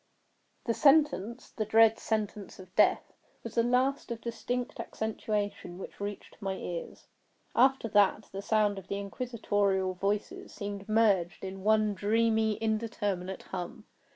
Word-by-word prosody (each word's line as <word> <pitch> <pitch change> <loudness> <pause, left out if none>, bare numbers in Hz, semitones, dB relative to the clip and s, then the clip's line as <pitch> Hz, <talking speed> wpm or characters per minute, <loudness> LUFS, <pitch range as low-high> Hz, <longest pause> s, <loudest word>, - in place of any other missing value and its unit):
The 230 - +1
sentence—the 255 -6 +2
dread 225 +1 +5
sentence 210 -3 -3
of 185 -1 -13
death—was - - 0
the 230 - +3
last 255 +4 +1
of 235 -1 -4
distinct 245 +1 -4
accentuation 210 -4 -3
which 190 - -9
reached 205 0 -6
my 195 -1 -1
ears. 175 -2 -6 0.5
After 265 -1 +4
that, 205 0 +3
the 195 - -5
sound 205 -1 +2
of 190 - -14
the 200 - -2
inquisitorial 200 -3 0
voices 200 +3 -2
seemed 200 0 -6
merged 200 -6 +2
in 190 0 -6
one 215 0 +3
dreamy 220 +1 +2
indeterminate 210 -4 -2
hum. 210 +5 -6
210 Hz, 125 wpm, -30 LUFS, 195-230 Hz, 0.5 s, dread